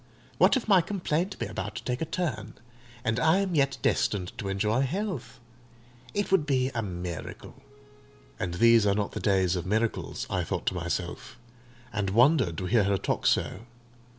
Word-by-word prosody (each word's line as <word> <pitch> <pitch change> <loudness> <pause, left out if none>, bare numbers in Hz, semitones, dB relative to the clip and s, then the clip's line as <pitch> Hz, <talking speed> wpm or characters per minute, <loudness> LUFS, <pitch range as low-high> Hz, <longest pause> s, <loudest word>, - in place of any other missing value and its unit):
What - - +5
if 245 - -4
my 195 -4 +6
complaint 180 0 -2
be - - -3
about - - -5
to - - -6
take 125 0 -3
a - - 0
turn, 130 - -3 0.5
and 110 +1 0
I 160 +6 +4
am 195 -2 0
yet 140 -3 +2
destined 90 -4 0
to 100 - -3
enjoy 105 +5 +1
health? 170 - -3 0.8
It 205 -1 -1
would 165 -6 +3
be 130 -2 +2
a 115 - -1
miracle!" 90 -4 -6 0.9
"And 85 -1 -2
these 115 +1 +5
are 100 - +3
not 105 -1 -1
the - - -5
days 95 -3 +2
of 90 0 -3
miracles," 110 +3 -1
I - - -1
thought - - -3
to - - +1
myself, 90 +7 -4 0.6
and 100 -1 -1
wondered 120 - +3
to 90 - -3
hear 105 +1 +3
her 100 0 +2
talk - - -1
so. 110 +5 0
115 Hz, 180 wpm, -28 LUFS, 95-155 Hz, 0.9 s, my